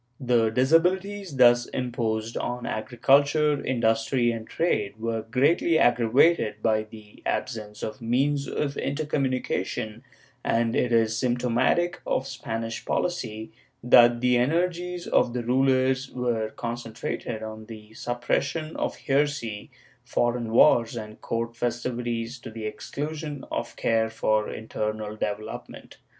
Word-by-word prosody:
^ - - -8
The 115 -2 +4
disabilities 180 - +1
thus 120 -1 +6
imposed 115 -3 -2
on 125 0 -3
agriculture, 140 +6 +2
industry, 120 0 +1
and 115 -1 -6
trade 105 -11 -1
were 115 0 -2
greatly 140 +8 +2
aggravated 120 -2 +3
by 110 -1 +2
the 105 -1 -14
absence 105 -4 -3
of 110 +4 -5
means 140 +4 +1
of 140 -1 -2
intercom 145 -1 -1
munication, 110 -3 -2 0.4
and 115 0 +1
it 125 - +1
is 115 -1 +3
symptomatic 125 +8 +1
of 130 - 0
Spanish 115 -3 -5
policy 110 -11 -2 0.3
that 120 -1 +6
the 125 -1 +4
energies 175 +6 0
of 120 - +2
the 125 -1 -2
rulers 130 +1 +2
were 120 -3 -1
concentrated 115 -1 -5
on 110 0 -8
the 110 -1 -11
suppression 140 +7 -2
of - - -2
heresy, 140 -7 -1 0.3
foreign 120 -1 0
wars 115 0 +5
and 110 -2 -8
court 115 0 -3
festivities 120 0 -3
to 120 - -9
the 110 -1 -7
exclusion 150 +5 -5
of - - -3
care 110 -1 +1
for 110 -1 0
internal 110 -1 -4
development. 105 0 -6
120 Hz, 125 wpm, -26 LUFS, 110-135 Hz, 0.4 s, thus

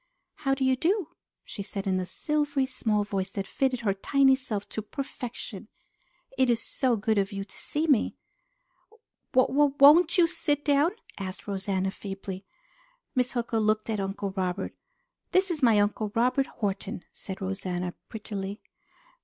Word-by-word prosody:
"How 270 -2 +1
do 265 0 0
you 260 0 +4
do?" 340 - +1 0.3
she 200 - -7
said 195 0 -5
in 190 -1 +1
a 185 - -3
silvery, 290 0 0
small 220 -5 0
voice 195 -2 -2
that 195 -1 -2
fitted 255 +2 0
her 205 -4 +2
tiny 270 +7 +4
self 235 -6 -4
to 220 - -3
perfection. 240 -3 -6 0.7
"It 260 -1 +4
is 235 -2 +3
so 250 +1 0
good 215 0 +1
of 195 0 0
you 195 -1 -3
to 195 - -14
see 300 +2 -2
me!" 280 -8 +3 1.2
"W 255 -1 +5
w 285 0 +3
won't 315 +5 +8
you 350 - +7
sit 295 -3 -1
down?" 290 +5 +4 0.3
asked 190 0 -6
Rosanna 195 -1 -1
feebly. 195 -1 -7 0.7
Miss 250 -2 +1
Hooker 235 -2 0
looked 215 +1 +1
at 215 - -1
Uncle 195 0 -2
Robert. 185 -1 -2 0.6
"This 375 0 +4
is 315 -3 -3
my 230 -5 +5
Uncle 205 +1 0
Robert 255 +4 +2
Horton," 200 -2 -3
said 190 - -7
Rosanna 185 -2 -3 0.2
prettily. 205 -2 -5
220 Hz, 160 wpm, -28 LUFS, 195-270 Hz, 1.2 s, won't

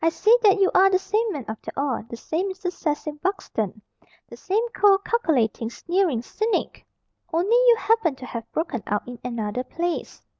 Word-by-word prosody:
"I 330 - +5
see 430 +7 +4
that 405 -3 +5
you 385 - +4
are 385 +1 +6
the 375 - +3
same 430 +4 0
man 285 - -5
after 220 0 -6
all. 275 -3 -1
The 235 - -7
same 355 +10 -2
Mr. 375 -1 -4
Cecil 300 -3 -3
Buxton. 225 - -3 0.5
The - - -10
same 435 +5 -1
cold, 400 -2 +3
calculating, 255 - +1
sneering 340 -2 0
cynic. 435 - -2 0.5
Only 345 +6 0
you - - +6
happen 450 -10 +1
to 255 - -10
have 230 -2 -7
broken 310 -7 -2
out 205 +2 -2
in 245 -1 -8
another 235 -1 -3
place. 345 +5 -4
335 Hz, 180 wpm, -24 LUFS, 245-395 Hz, 0.5 s, are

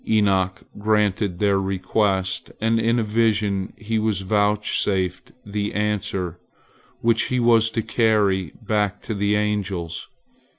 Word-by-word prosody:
Enoch 95 -3 +2 0.2
granted 105 -3 +1
their 100 0 +2
request, 95 0 -1
and 115 +1 +2
in 115 +1 +2
a 115 - +1
vision 105 -3 +1
he 110 +1 -2
was 105 -3 0
vouchsafed 100 -2 0
the 105 0 -3
answer 100 -4 -2 0.6
which 115 -2 +2
he 125 - 0
was 115 -2 +4
to 115 0 -2
carry 100 -8 +1
back 105 -2 0
to 110 - -5
the 100 0 +1
angels. 100 -5 -2
105 Hz, 125 wpm, -22 LUFS, 95-110 Hz, 0.6 s, was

